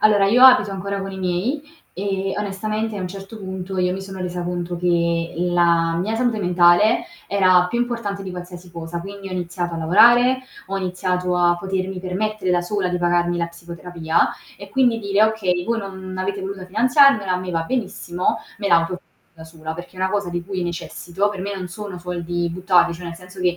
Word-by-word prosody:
Allora, 205 -2 +5
io 245 +6 +6
abito 255 -6 +7
ancora 200 +1 -3
con 195 0 -5
i 190 - -7
miei, 190 +11 -1 0.3
e 195 0 -2
onestamente 215 +2 -2
a - - -4
un 185 - -3
certo 195 +3 -9
punto, 190 -1 -5
io 180 0 +2
mi 190 - -4
sono 190 -1 -8
resa 180 -1 -3
conto 175 0 -3
che 170 -1 0
la 170 -1 +2
mia 215 +5 -1
salute 235 -1 +1
mentale, 180 +3 +4 0.2
era 185 -2 +4
più 235 - -1
importante 230 -5 -2
di 190 - -6
qualsiasi 180 0 -9
cosa, 170 0 -6
quindi 195 +1 -8
ho - - -7
iniziato 175 -1 -3
a - - -4
lavorare, 240 +9 +5 0.2
ho 195 - -3
iniziato 180 -1 -1
a 175 0 +3
potermi 190 0 -3
permettere 185 +1 -2
da 175 - +3
sola 185 +1 -1
di 180 0 -1
pagarmi 175 0 +1
la 170 - 0
psicoterapia, 170 -1 -1 0.3
e 200 +1 -10
quindi 245 -4 +2
dire: 200 0 +3
"Okay 185 -5 0
voi 235 0 0
non 190 -2 -7
avete 195 +1 -2
voluta 190 0 -5
finanziarmela, 225 +1 +4
a - - +2
me 185 0 -5
va 165 -1 0
benissimo, 185 -4 -2 0.2
me 200 -1 -1
la 170 - +6
autofinanzio 165 +2 -2 0.3
da 160 - -12
sola, 160 -1 -7
perché 175 +2 -10
è - - -7
una 190 0 +1
cosa 200 -3 -1
di 175 0 -3
cui 190 -1 -3
necessito". 175 +2 -2
Per 205 -2 -5
me 200 +2 -3
non 185 -1 -5
sono 195 0 -7
soldi 175 -1 -3
buttarli, 180 -1 +3
cioè 175 +1 -8
nel 170 - -6
senso 180 +2 -12
che 180 -1 +1
185 Hz, 205 wpm, -21 LUFS, 175-200 Hz, 0.3 s, abito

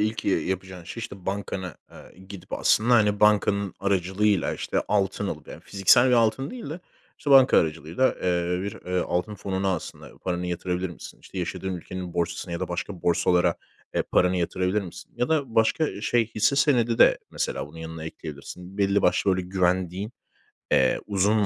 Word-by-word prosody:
ilk, 110 +1 -1
iii, 95 - +1
yapacağın 95 -1 -4
şey, 115 - -7
işte, 100 -4 -8
bankana, 95 -2 -3
aaa, - - -14 0.2
gidip 100 -1 -11
aslında, 120 +3 +3
hani, 105 -3 +3
bankanın 100 -2 +3
aracılığıyla, 100 0 +1
işte, - - -2
altın 100 -3 0
alıp - - -6
yani - - -9
fiziksel 100 +6 +4
bir 125 - +3
altın 115 +3 +2
değil 240 - -7
de, 165 +4 -6 0.4
işte, 145 - -3
banka 135 -1 +7
aracılığıyla, 80 - 0
eee, 90 0 0
bir, 100 - -3
eee, 90 0 0
altın 90 +4 -1
fonuna 95 -1 -1
aslında 85 - -9
paranı 90 -1 -3
yatırabilir 90 +1 -2
misin? 85 - -11
İşte, 95 - -9
yaşadığın 95 +1 -3
ülkenin 90 0 -7
borsasına 85 +1 -2
ya 85 - -3
da - - -2
başka 90 +1 -5
borsalara, 90 0 +3 0.4
eee, - - +2
paranı 90 0 +2
yatırabilir 90 +3 0
misin? 90 -3 -10
Ya 125 - 0
da 140 -7 0
başka 115 +3 +2
şey, 115 +1 +2
hisse 110 +6 +2
senedi 120 -5 +3
de - - +6
mesela - - -3
bunun 80 +3 -13
yanına 80 0 -7
ekleyebilirsin. 85 +5 -9
Belli 100 0 +2
başlı 100 - +3
böyle 95 - -2
güvendiğin, 95 +3 0 0.6
eee, 65 - +3
uzun 105 +1 +2
95 Hz, 175 wpm, -25 LUFS, 90-105 Hz, 0.6 s, banka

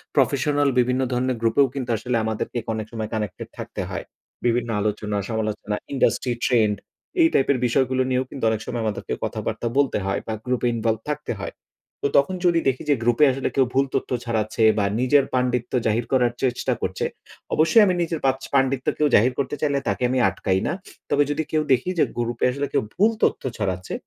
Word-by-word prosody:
Professional 145 +1 +2
বিভিন্ন 125 +1 +2
ধরনের 125 0 0
গ্রুপেও 115 +5 +4
কিন্তু 130 -3 -4
আসলে 125 +3 -2
আমাদেরকে 110 +2 -3 0.2
অনেক 110 -1 -3
সময় 110 -2 -4
কানেক্টেড 105 -4 -4
থাকতে - - -5
হয়। - - -4 0.4
বিভিন্ন 120 0 +1
আলোচনা 105 0 -1
সমালোচনা, 110 -2 -2 0.2
ইন্ডাস্ট্রি 130 -2 +1
ট্রেন্ড 110 -4 +3 0.5
এই 325 - +7
টাইপের 135 0 +3
বিষয়গুলো 130 +1 +2
নিয়েও 130 0 +1
কিন্তু 135 - -8
অনেক 110 -1 -1
সময় 120 -2 -3
আমাদেরকে 105 -2 -3
কথাবার্তা 120 - -3
বলতে 140 -1 +3
হয় 100 - 0
বা 110 - -2
গ্রুপে 125 -1 0
ইনভলভড 110 -1 0
থাকতে 150 0 -3
হয়। - - -5 0.5
তো - - +4
তখন 140 +7 +3
যদি 170 -1 +4
দেখি 130 -1 0
যে 145 - +5
গ্রুপে 120 +4 +3
আসলে 130 +1 -2
কেউ 135 -1 +4
ভুল 135 +1 +3
তথ্য - - -1 0.2
ছড়াচ্ছে 110 -1 0
বা 105 - +2
নিজের 135 +2 +4
পাণ্ডিত্য 125 -1 0
জাহির 110 +2 +1
করার 125 -2 +3
চেষ্টা 125 -2 +1
করছে। - - -2 0.5
অবশ্যই 160 +8 +5
আমি 185 - +2
নিজের 165 -1 -1
পাচ 135 0 +2
পাণ্ডিত্য 135 -1 +1
কেউ 150 - +3
জাহির 125 +5 +4
করতে 140 +1 -1
চাইলে 140 -2 +1
তাকে - - -1
আমি 130 +1 +1
আটকাই 95 -2 0
না। - - 0 0.4
তবে 145 - +4
যদি 155 +2 -1
কেউ 155 - +2
দেখি 130 +7 +3
যে - - +6
গ্রুপে 120 -1 -1
আসলে 140 +2 -2
কেউ - - +2
ভুল 215 +4 +4
তথ্য - - +2
ছড়াচ্ছে, 95 -3 -3
125 Hz, 185 wpm, -23 LUFS, 110-140 Hz, 0.5 s, এই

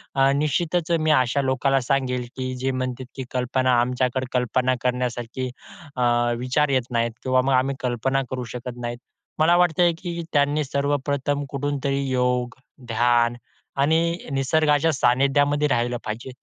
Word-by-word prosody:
अ, 135 0 +4
निश्चितच 155 +3 0
मी 155 0 +2
अशा 130 -1 +3
लोकांना 135 +1 +1
सांगेन, 125 -1 0
की 130 -1 -3
जे 135 +1 0
म्हणतात 130 0 -3
की 135 - -4
कल्पना, 125 0 +1
आमच्याकडे 125 +1 0
कल्पना 125 +1 +1
करण्यासारखी, 125 0 -2 0.5
अ, 125 - 0 0.3
विचार 130 +4 +1
येत 130 -2 +2
नाहीत 115 0 +1
किंवा 130 -1 +3
मग 135 +1 +1
आम्ही 130 +2 +2
कल्पना 130 +2 0
करू 130 -1 -4
शकत 125 0 -6
नाहीत. 120 0 -4 0.4
मला 165 +3 +5
वाटतंय 175 0 +3
की 170 -1 -4
त्यांनी 145 +1 +2
सर्वप्रथम 140 0 -1
कुठूनतरी 140 0 -2
योग, 125 -1 0 0.3
ध्यान 120 +1 +2 0.5
आणि 165 +3 +2
निसर्गाच्या 150 +3 +2
सानिध्यामध्ये 140 +3 +2
राहिलं 120 -2 0
पाहिजे. 110 +5 -5
130 Hz, 140 wpm, -23 LUFS, 125-145 Hz, 0.5 s, मला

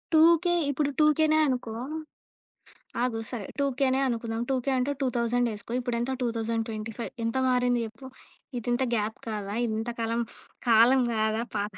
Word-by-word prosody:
2కే 335 +2 +6 0.2
ఇప్పుడు 285 +1 0
2కేనే 310 +1 +4
అనుకో, 250 -4 -2 1.3
ఆగు 245 -3 0
సరే. 225 -6 -5
2కేనే 270 -1 +1
అనుకుందాం. 230 -1 -2
2కే 265 0 0
అంటే 265 +3 0
2000 245 -2 +1
ఏసుకో. 210 +2 -9
ఇప్పుడెంత? 240 0 -2
2025 225 -1 -3
ఎంత 230 +3 -1
మారింది 245 -1 +2
జెప్పు? 225 +4 -10 0.5
ఇదింత 240 +2 0
గ్యాప్ 215 0 -1
కాదా? 210 -2 -4
ఇంత 220 +2 -2
కాలం 230 +1 0 0.5
కాలం 235 +4 +6
గాదా? 220 +1 +1
పా 205 - 0
240 Hz, 125 wpm, -27 LUFS, 225-265 Hz, 1.3 s, 2కే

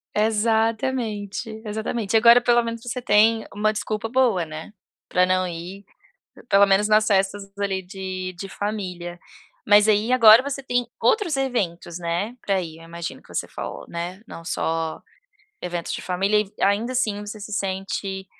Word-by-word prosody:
Exatamente, 220 -1 0 0.2
exatamente. 220 0 -2
Agora 235 +2 +8
pelo 240 0 +3
menos, 230 -1 -5
você 245 +1 -4
tem 225 -1 +4
uma 215 +1 0
desculpa 215 +1 -3
boa, 230 -8 +2
né? 155 +4 -8 0.4
Pra 180 0 +3
não 185 0 +1
ir, 175 +3 -7 0.7
pelo 200 +1 +6
menos 195 +2 +3
nas 215 0 +4
festas 195 -1 0
ali, 195 -2 -1
de 185 -1 -5
de 195 +2 -7
família. 180 -4 -5 0.5
Mas 205 +1 +6
aí, 215 +3 +2
agora 230 -2 +8
você 275 0 -4
tem 245 -1 0 0.2
outros 345 -10 +2
eventos, 190 -10 -2
né, 175 +7 -2
pra 195 -2 +1
ir? 160 -2 -8
Eu 165 - -14
imagino 170 0 -7
que - - -23
você - - -2
falou, - - -7
né, 175 +3 -5
não 165 - -9
só 165 -2 -2 0.6
eventos 175 -1 -3
de - - -4
família 195 +4 +1
e 205 -1 -7
ainda 210 +5 +2
assim 215 -5 0
você 210 +1 -7
se 210 - -8
sente 195 0 -3
205 Hz, 160 wpm, -23 LUFS, 185-225 Hz, 0.7 s, Agora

